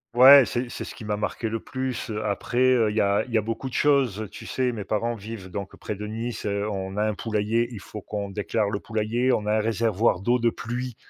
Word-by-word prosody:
Ouais, 135 +2 +10
c'est 120 0 -2
c'est - - -5
ce - - -9
qui 110 - -9
m'a 105 0 -1
marqué 110 +2 -2
le 115 0 -2
plus. 130 -2 -4
Après, 105 +4 -3
heu, 125 -4 +4
il 105 - -4
y - - +3
a 100 0 +2
il - - -11
y 115 - +3
a - - +3
beaucoup 115 +5 -4
de - - -8
choses. 130 -8 +2
Tu - - -10
sais, 130 -1 0
mes 105 -4 -5
parents 110 +4 -1
vivent 105 -3 -8
donc 100 0 -6
près 105 - -5
de 105 +1 -6
Nice, 115 +1 -4
heu, 100 +1 -1
on 95 -1 -4
a 105 - +2
un 105 - 0
poulailler, 110 +2 0
il 110 - -7
faut 105 +1 -9
qu'on 100 -1 -4
déclare 105 0 -1
le 100 - -2
poulailler. 115 +3 0
On 105 - +1
a 105 +1 +2
un - - +2
réservoir 110 -2 +1
d'eau 120 +4 +2
de 115 0 +3
pluie, 120 +1 -5
110 Hz, 255 wpm, -25 LUFS, 105-120 Hz, -, Ouais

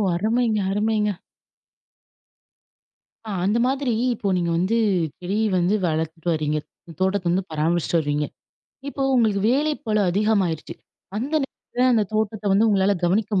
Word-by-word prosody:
அருமைங்க! 220 +3 +1
அருமைங்க! 210 +1 +1 2.2
ஆ - - -3
அந்த 210 +4 +2
மாதிரி 265 -2 0 0.2
இப்போ 200 -2 -2
நீங்க 170 -1 0
வந்து 190 +7 +1 0.4
செடி 185 +3 -2 0.2
வந்து 180 +4 +2
வளத்துட்டு 160 0 -2
வரீங்க. 155 -1 -1 0.4
தோட்டத்த 190 -1 +1
வந்து 185 +3 +1
பராமரிச்சிட்டு 165 +2 +1
வருரீங்க. 150 -1 -1 0.6
இப்போ 280 -1 -4
உங்களுக்கு 220 -5 +2
வேலை 295 +4 +2
பழு 215 -1 +2
அதிகமாயிருச்சு. 195 -5 0 0.4
அந்த 265 +8 -3
நேரத்தில 250 -1 -2
அந்த 220 -3 +3
தோட்டத்த 215 -1 -1
வந்து 210 +4 +4
உங்களால 200 -1 +2
கவனிக்க 200 +2 +1
200 Hz, 125 wpm, -23 LUFS, 175-220 Hz, 2.2 s, வந்து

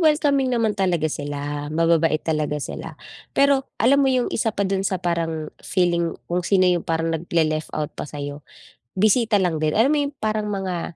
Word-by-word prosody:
welcoming 295 -4 +3
naman 225 -2 +1
talaga 185 -5 0
sila 145 -1 -3
mababait 165 0 +2
talaga 155 -2 -1
sila. 145 - -6 0.4
Pero 275 -1 +3
alam 265 +6 +4
mo 270 - +3
yung 255 -2 +1
isa 225 - 0
pa 200 - +1
do'n 190 0 0
sa 195 -1 0
parang 165 -3 -2
feeling 170 -2 0
kung 175 +1 -1
sino 185 +1 +2
yung 180 -2 +3
parang 165 0 -1
nag 165 +2 -4
le-left 155 -2 0
out 150 -1 -3
pa - - -7
sa'yo, 145 0 -6 0.6
bisita 215 +3 +3
lang 180 -6 +1
din, 155 -1 0
alam 230 +6 +4
mo 300 - +2
yung 280 - -10
parang 215 -1 0
mga 185 -4 -3
175 Hz, 185 wpm, -22 LUFS, 155-215 Hz, 0.6 s, alam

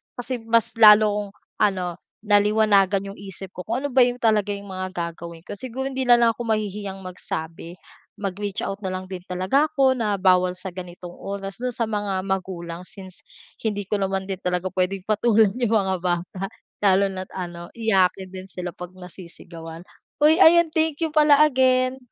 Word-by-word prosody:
kasi 250 0 -4
mas 230 0 +2
lalo 215 -1 +8
akong 205 -1 -4 0.3
ano, 190 -4 +1 0.4
naliwanagan 205 -2 +3
'yong 200 - -13
isip 195 -1 -9
ko 180 - -9
kung 240 +4 -1
ano 285 - -1
ba 250 -1 +6
yung 245 0 -4
talaga 210 -2 +2
yung 200 0 -10
mga 185 0 -4
gagawin 170 -1 -6
ko. - - -10
Siguro, 260 +3 -5
hindi 260 0 -1
na 240 - +8
lang 230 -1 +4
ako - - -8
mahihiyang 205 -2 -2
magsabi, 170 -2 -6 0.4
mag-reach 200 0 -4
out 195 +1 -4
na 190 - -4
lang 185 0 -5
din 180 -1 -5
talaga 190 +12 +1
ako 275 -3 +2
na 215 -4 0
bawal 185 -1 +3
sa 190 0 -7
ganitong 180 -1 -9
oras 195 +1 -6
do'n 250 -1 -3
sa 235 - -1
mga 205 -3 -2
magulang 180 -3 -4
since 190 -2 -11 0.4
hindi 205 -2 -2
ko 205 +1 -2
naman 195 0 -1
din 190 -1 -5
talaga 180 0 -2
puwedeng 185 0 -1
patulan 215 0 +3
'yong 240 0 -2
mga 190 -3 +1
bata 180 +1 -2 0.4
lalo 195 +1 +4
na't 185 -1 -7
ano, 175 -2 -7
iyakin 190 -4 +1
din 185 0 -9
sila 180 0 -5
'pag 180 +1 -9
nasisigawan. 170 -2 -11 0.4
Uy, 310 +2 +6
ayan, 340 -2 +6
thank 320 -1 0
you 325 - +1
pala 300 -1 +5
again. 255 -2 +2
195 Hz, 180 wpm, -23 LUFS, 185-225 Hz, 0.4 s, lalo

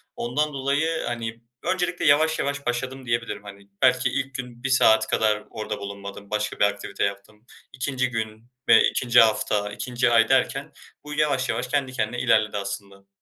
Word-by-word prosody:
Ondan 145 +5 -1
dolayı, 145 +4 0
hani, 115 -1 -4 0.2
öncelikle 180 -1 -1
yavaş 155 +2 +4
yavaş 140 0 -2
başladım 130 +2 -3
diyebilirim. 115 -3 -2
Hani, 100 0 -12
belki 130 0 +4
ilk 135 +2 -3
gün 125 -2 -7
1 135 - -1
saat 110 -4 +4
kadar 105 -1 +1
orada 110 -1 -5
bulunmadım 100 0 -8
başka 105 0 -2
bir - - +5
aktivite 100 -1 -2
yaptım. 100 +3 -5 0.3
2'nci 130 -1 -1
gün 110 -1 -5 0.2
ve - - +7
2'nci 120 -1 +3
hafta, 105 -2 +1
2'nci 125 +3 -1
ay 115 -1 +4
derken 135 +2 +1 0.3
bu 150 - -7
yavaş 145 -4 +1
yavaş 120 +2 -1
kendi 135 -1 -1
kendine 120 -1 -2
ilerledi 110 -3 +2
aslında. 100 0 -7
120 Hz, 165 wpm, -24 LUFS, 105-135 Hz, 0.3 s, ve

